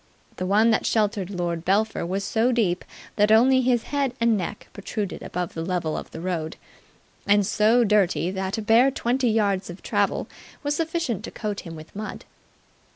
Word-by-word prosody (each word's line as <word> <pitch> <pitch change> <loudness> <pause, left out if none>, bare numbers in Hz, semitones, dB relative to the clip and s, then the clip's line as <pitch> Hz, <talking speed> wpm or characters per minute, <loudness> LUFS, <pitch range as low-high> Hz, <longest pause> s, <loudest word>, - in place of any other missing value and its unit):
The 185 - -2
one 215 +4 +4
that 220 - +1
sheltered 205 -4 0
Lord 175 -3 -3
Belpher 200 0 +1
was 195 +3 -2
so 225 +5 +1
deep 205 -8 +1 0.3
that 210 0 +4
only 260 +4 +6
his 245 -2 +2
head 280 -3 -1
and 230 -1 +3
neck 200 +2 -4
protruded 200 0 -4
above 180 -1 -4
the 165 - -4
level 175 -3 -2
of - - -6
the - - -8
road, 170 -3 -3 0.7
and 205 0 +4
so 220 +4 +3
dirty 195 -4 +2
that 190 +2 -3
a 220 - -3
bare 230 +5 +5
twenty 255 -1 0
yards 200 -4 +1
of 175 +2 -9
travel - - 0 0.4
was 290 0 0
sufficient 325 - -2
to - - -6
coat 210 -2 -4
him 165 -2 -8
with 155 +3 -12
mud. 215 +1 -6
210 Hz, 180 wpm, -24 LUFS, 185-230 Hz, 0.7 s, only